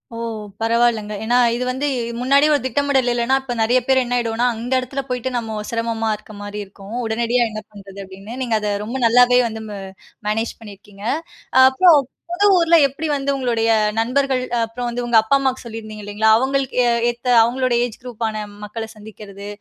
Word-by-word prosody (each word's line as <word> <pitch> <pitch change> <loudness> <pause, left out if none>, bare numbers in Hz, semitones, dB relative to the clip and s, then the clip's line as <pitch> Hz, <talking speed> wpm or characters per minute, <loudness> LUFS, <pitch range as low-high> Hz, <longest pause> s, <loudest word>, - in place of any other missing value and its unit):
ஓ! - - -6 0.4
பரவாயில்லங்க. 225 -2 +1
ஏன்னா, 240 +3 +2 0.2
இது 245 - -2
வந்து 260 +3 -2 0.3
முன்னாடி 275 +3 +4
ஒரு 290 - +2
திட்டமிடல் 265 0 +1
இல்லன்னா, 240 +2 +1
இப்ப 255 -2 -5
நெறைய 240 +3 +3
பேர் 265 0 +4
என்ன 245 0 -2
ஆயிடுவோம்னா, 235 0 0
அந்த 235 +3 -6
எடத்துல 255 +2 -4
போயிட்டு 250 0 -2
நம்ம 225 -2 -4
சிரமமா 230 -1 -1
இருக்க 215 +1 -14
மாரி 205 +1 -6
இருக்கும். 200 +2 -11
உடனடியா 235 +2 +1
என்ன 215 0 -6
பண்றது 200 -1 -12
அப்படின்னு, 195 +6 -10
நீங்க 230 -3 +1
அத 210 -1 -2
ரொம்ப 240 +5 -4
நல்லாவே 245 +1 +5
வந்து 220 -1 -7
ம் - - -6 0.5
மேனேஜ் 225 +2 -2
பண்ணிருக்கீங்க. 205 -2 -13 0.7
அப்புறம் 340 +3 +6 0.3
புது 405 +4 +2
ஊர்ல 335 -1 +4
எப்படி 305 +4 -5
வந்து 280 0 -1
உங்களுடைய 240 -4 0 0.3
நண்பர்கள், 260 +2 +1 0.2
அப்புறம் 240 +2 -4
வந்து 240 +1 -3
உங்க 240 -1 +3
அப்பா, 220 +5 +2
அம்மாவுக்கு 265 -1 -1
சொல்லிருந்தீங்க 215 -2 -8
இல்லைங்ளா? 205 +2 +1
அவுங்களுக்கு 265 +1 -1 0.3
ஏத்த 240 +1 -6
அவுங்களுடைய 240 +1 +1
ஏஜ் 235 -3 -8
குரூப்பான 225 -3 -4 0.2
மக்கள 220 +2 -6
சந்திக்கிறது, 210 -2 -11
235 Hz, 170 wpm, -20 LUFS, 220-255 Hz, 0.7 s, அப்புறம்